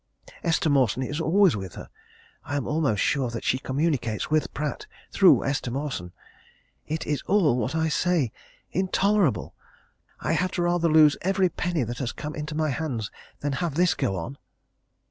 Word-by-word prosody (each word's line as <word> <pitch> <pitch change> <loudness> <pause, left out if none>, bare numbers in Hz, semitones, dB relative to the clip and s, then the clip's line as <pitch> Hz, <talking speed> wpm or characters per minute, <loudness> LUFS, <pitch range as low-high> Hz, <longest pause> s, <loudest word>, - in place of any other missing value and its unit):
Esther 165 -1 +1
Mawson 130 -4 +2
is 145 +5 -3
always 185 - +4
with 95 -4 -6
her. - - -8 0.6
I 145 - -4
am 140 - -1
almost 150 -9 +1
sure 135 -3 +1
that 115 -1 -5
she 130 - +1
communicates 135 -5 -1
with 155 0 +1
Pratt 150 0 -4 0.2
through 195 -2 +5
Esther 135 -2 -1
Mawson. 125 -9 -4 0.8
It 160 +2 -3
is 150 -1 -1
all 180 -10 +3
what 125 +5 -2
I 160 0 +1
say 160 -6 +1 0.4
intolerable! 190 - +1 0.7
I - - -1
had 185 +4 0
rather 175 -1 +2
lose 155 -2 +6
every 190 0 +2
penny 175 -5 -1
that 120 +1 -5
has 125 -3 -2
come 150 0 -6
into 150 0 -5
my 155 -1 0
hands 125 -7 -3 0.3
than 145 - -1
have 170 -5 -2
this 180 +1 +3
go 95 - -1
on." 120 +11 -6
150 Hz, 165 wpm, -25 LUFS, 130-170 Hz, 0.8 s, lose